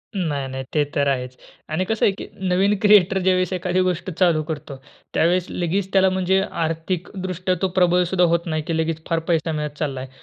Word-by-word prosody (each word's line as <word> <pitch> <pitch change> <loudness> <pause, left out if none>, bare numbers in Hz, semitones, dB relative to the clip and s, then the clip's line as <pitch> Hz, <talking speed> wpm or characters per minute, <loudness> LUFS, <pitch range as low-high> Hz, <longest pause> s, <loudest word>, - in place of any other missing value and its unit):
नाही, 150 -8 -1
नाही. 130 0 -5
ते 150 - +3
तर 140 0 +2
आहेच. 125 -2 -1 0.3
आणि 165 +5 -1
कसं 220 +3 +1
आहे, - - +4
की - - -7 0.2
नवीन 195 +3 +2
क्रिएटर, 200 -3 +5
ज्यावेळेस 185 -1 +2
एखादी 180 0 0
गोष्ट 185 0 -1
चालू 170 -4 +4
करतो, 150 -2 -6 0.4
त्यावेळेस 175 +2 +2
लगेच 185 +3 -2
त्याला, 190 -1 +5
म्हणजे 190 +1 +1 0.2
आर्थिक 165 +2 -3 0.2
दृष्ट्या 185 0 -1
तो 190 - +2
प्रबळसुद्धा 180 0 +3
होत 170 0 +1
नाही, 155 -2 -1
की 165 - -1
लगेच 160 0 -1
फार 165 -1 +1
पैसा 165 -1 +1
मिळत 150 -1 -4
चालला 140 -4 -2
आहे. 130 - -8
175 Hz, 195 wpm, -22 LUFS, 155-185 Hz, 0.4 s, क्रिएटर